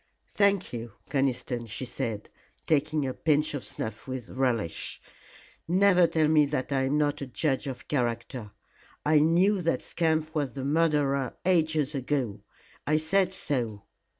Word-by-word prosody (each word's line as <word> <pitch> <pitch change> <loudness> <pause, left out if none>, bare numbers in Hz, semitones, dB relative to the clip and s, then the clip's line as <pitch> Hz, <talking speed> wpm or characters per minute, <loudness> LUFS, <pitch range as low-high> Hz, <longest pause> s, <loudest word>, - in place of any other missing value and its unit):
"Thank 200 -5 +2
you, 115 -2 -6 0.2
Conniston," 125 -3 -1
she 115 +4 -5
said, 115 -4 -4 0.4
taking 155 -1 +1
a 130 - -2
pinch 150 +1 +1
of 145 - -4
snuff 110 - -5
with 130 -3 -5
relish. 120 -10 -2 0.7
"Never 180 0 +5
tell 160 -2 +2
me 150 -1 +4
that 140 -1 -3
I 135 -1 +1
am 140 +3 +1
not 145 -1 0
a 140 - -4
judge 135 +1 -1
of 130 -2 -7
character. 120 -3 -2 0.6
I 150 0 +5
knew 180 +6 +3
that 165 -1 0
scamp 160 -2 0
was 145 -5 -1
the 135 -1 -5
murderer 145 -3 +1
ages 160 -5 +2
ago. 130 -6 -2 0.5
I 155 +1 +3
said 180 +4 +2
so. 120 - -1
145 Hz, 150 wpm, -28 LUFS, 130-160 Hz, 0.7 s, Never